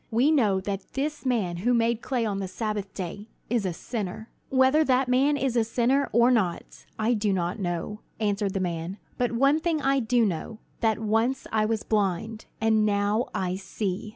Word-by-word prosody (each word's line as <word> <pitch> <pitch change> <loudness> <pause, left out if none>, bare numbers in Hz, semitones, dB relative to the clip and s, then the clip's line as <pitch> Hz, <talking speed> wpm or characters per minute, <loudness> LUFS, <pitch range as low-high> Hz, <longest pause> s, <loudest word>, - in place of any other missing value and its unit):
We 245 +7 +3
know 215 -11 +3
that 195 0 -5
this 290 0 -2
man 200 -9 0
who 240 +7 +2
made 230 0 +1
clay 250 -3 -1
on 200 -2 -2
the 195 - -3
Sabbath 210 0 -3
day 200 +4 -6 0.2
is 230 -5 +1
a - - -1
sinner." 215 +3 -5 0.2
"Whether 265 +4 +4
that 265 -2 +2
man 270 +4 +3
is 265 -3 -1
a 235 - +4
sinner, 245 +5 +1
or 235 +3 +5
not, 195 -8 -1
I 225 +2 +2
do 210 -2 +1
not 180 +1 -1
know," 175 +3 -3 0.2
answered 205 -2 0
the - - +1
man; 175 +1 -3 0.2
"but 245 -1 +1
one 275 +6 +3
thing 320 -1 0
I 275 0 +2
do 235 -1 +2
know, 195 +3 -3 0.2
that 220 -2 +2
once 225 +4 0
I 215 -1 +2
was 220 0 -1
blind, 215 +1 -1
and 220 -1 +3
now 210 +4 +1
I 185 0 -1
see. 195 +1 -4
220 Hz, 190 wpm, -26 LUFS, 195-250 Hz, 0.2 s, or